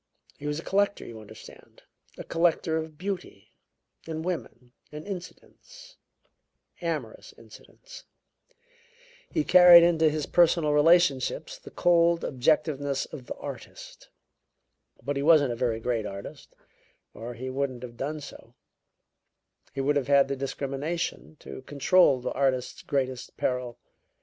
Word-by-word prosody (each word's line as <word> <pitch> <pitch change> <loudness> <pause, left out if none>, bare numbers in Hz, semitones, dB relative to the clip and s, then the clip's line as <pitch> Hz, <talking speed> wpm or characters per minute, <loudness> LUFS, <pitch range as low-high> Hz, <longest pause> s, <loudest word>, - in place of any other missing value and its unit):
He 145 - -8
was 150 +1 -2
a - - -8
collector, 200 +1 0
you 115 -2 -9
understand, 110 - -15 0.3
a - - -7
collector 165 -1 +1
of 160 -1 -5
beauty, 180 - -6 0.5
and 160 0 -5
women, 125 -9 -5 0.2
and 150 +1 -9
incidents 200 - -11 0.8
amorous 155 -10 -5
incidents. 115 - -15 1.2
He 315 - 0
carried 180 - +8
into 165 -2 +3
his 150 -1 -3
personal 170 -3 +3
relationships 150 -3 +2
the - - -12
cold 170 -1 +3
objectiveness 145 0 0
of 125 - -9
the - - -5
artist. - - -10 0.9
But 140 0 -2
he - - -1
wasn't 145 -4 +4
a - - -5
very 115 -2 -1
great 115 -2 -2
artist, 100 0 -10 0.6
or 115 +3 -8
he 130 +2 -6
wouldn't 130 -2 -3
have 120 -1 -9
done 150 +5 -4
so; 145 - -12 1.2
he 135 - -4
would 145 +2 +1
have 140 - -2
had 140 -1 +4
the 140 - -1
discrimination 140 +5 -4
to - - -9
control 140 0 +3
the - - -3
artist's 130 -2 -1
greatest 130 -3 -3
peril. 125 -2 -2
145 Hz, 130 wpm, -27 LUFS, 130-170 Hz, 1.2 s, carried